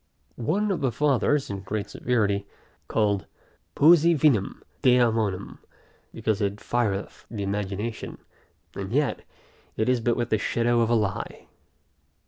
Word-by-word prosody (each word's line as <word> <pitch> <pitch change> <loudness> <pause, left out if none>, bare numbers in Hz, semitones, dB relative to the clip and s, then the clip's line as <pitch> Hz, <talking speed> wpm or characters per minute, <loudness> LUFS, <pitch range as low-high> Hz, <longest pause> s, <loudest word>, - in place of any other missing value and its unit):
One 195 - 0
of 175 -6 -2
the 135 -3 +1
fathers, 145 0 +1
in 100 - -4
great 100 +2 -4
severity, 100 -5 0 0.4
called 100 -3 0 0.5
poesy 170 +2 +6
vinum 135 -10 +1 0.2
daemonum, 115 -6 +2 0.5
because 110 -1 -1
it 100 +1 -1
fireth 105 -5 -2
the 105 -3 -4
imagination; 105 +3 -4 0.6
and 95 0 -6
yet, 145 +2 0 0.6
it 110 - 0
is 125 -2 +2
but 120 0 +1
with 120 -1 -2
the 110 - +3
shadow 120 +2 +1
of 115 - +1
a 120 - +3
lie. 105 -3 -2
115 Hz, 130 wpm, -25 LUFS, 100-125 Hz, 0.6 s, poesy